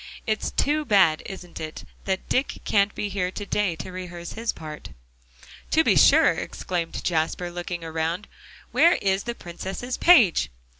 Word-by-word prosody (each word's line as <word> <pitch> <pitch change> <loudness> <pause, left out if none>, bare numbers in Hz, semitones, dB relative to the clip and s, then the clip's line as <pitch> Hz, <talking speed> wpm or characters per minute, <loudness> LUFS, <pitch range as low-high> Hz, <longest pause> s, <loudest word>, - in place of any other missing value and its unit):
It's 215 -1 -1
too 300 +2 +1
bad, 190 - +4
isn't 180 -3 -9
it, 155 0 -6 0.2
that 190 -1 -2
Dick 265 +2 0
can't 200 0 +2
be 210 - -2
here 195 -2 -2
to 205 +2 -6
day 200 -4 0
to 185 - -7
rehearse 175 -2 -7
his 230 +1 -2
part?" 155 -1 -9 0.8
"To - - +4
be - - +3
sure," - - +6
exclaimed 170 -2 -4
Jasper, 170 +1 -1
looking 175 -1 -5
around, 165 +4 -3 0.4
"where 340 +1 +5
is 195 0 0
the 235 0 -3
Princess's 190 +8 -6
page?" 225 - +5
185 Hz, 155 wpm, -25 LUFS, 170-210 Hz, 0.8 s, sure